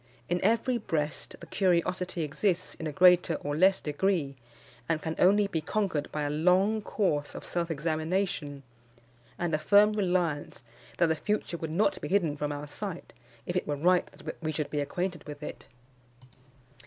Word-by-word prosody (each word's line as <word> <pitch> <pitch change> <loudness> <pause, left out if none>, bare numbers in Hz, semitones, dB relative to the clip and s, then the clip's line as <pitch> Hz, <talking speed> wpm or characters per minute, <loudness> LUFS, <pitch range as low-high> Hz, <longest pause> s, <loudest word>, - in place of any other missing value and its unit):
In 175 +1 -1
every 230 +4 +2
breast 150 -6 -3
the - - -10
curiosity 180 -1 0
exists 180 +4 -1
in 160 - -6
a - - -3
greater 180 +1 +5
or 145 0 -3
less 190 +4 +4
degree, 150 -2 0 0.5
and 165 -1 +1
can 160 +1 -4
only 205 +3 +5
be 170 -5 -2
conquered 175 -4 -1
by 150 - -2
a 145 - -1
long 185 +8 +3
course 165 -9 -1
of - - -7
self 170 -1 -2
examination, 160 -1 -2 0.7
and 175 -2 -2
a 155 - +2
firm 205 +5 +5
reliance 175 -10 -1 0.3
that 175 - +4
the 160 -1 +1
future 210 -1 -2
would 160 -1 -5
not 195 +4 +1
be - - -4
hidden 175 -7 +1
from 150 0 -2
our 145 0 -5
sight, 180 +4 -7 0.3
if 175 - -4
it 180 - -1
were 145 - 0
right 175 +5 +3
that - - -9
we 155 -1 -1
should 150 -1 -3
be 150 - 0
acquainted 175 +3 -3
with 150 0 -8
it. - - -8
170 Hz, 175 wpm, -29 LUFS, 150-190 Hz, 0.7 s, greater